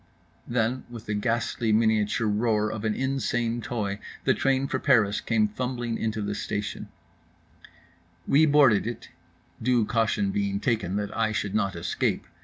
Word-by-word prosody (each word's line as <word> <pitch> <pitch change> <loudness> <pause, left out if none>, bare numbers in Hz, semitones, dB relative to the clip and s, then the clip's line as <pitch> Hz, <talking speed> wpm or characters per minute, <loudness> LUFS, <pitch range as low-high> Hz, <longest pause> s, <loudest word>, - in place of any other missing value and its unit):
Then 120 +2 0
with 115 -2 -9
the 105 - -2
ghastly 115 +1 0
miniature 110 0 +2
roar 105 0 +1
of 110 0 -5
an 110 -1 0
insane 120 -3 -1
toy 105 -4 -3 0.2
the - - +3
train 135 0 +1
for 130 - -2
Paris 115 -8 +3
came 110 -2 +2
fumbling 120 +1 -3
into 110 -1 -2
the 105 0 -2
station…. 105 0 -4 1.4
We 155 +3 +5
boarded 140 -8 +5
it, 120 - -6 0.5
due 120 -1 +2
caution 120 - +1
being 200 0 -1
taken 115 - -1
that 105 0 -3
I 110 -1 +1
should 105 -1 -2
not 100 -3 0
escape. 85 +1 -1
115 Hz, 150 wpm, -26 LUFS, 105-125 Hz, 1.4 s, We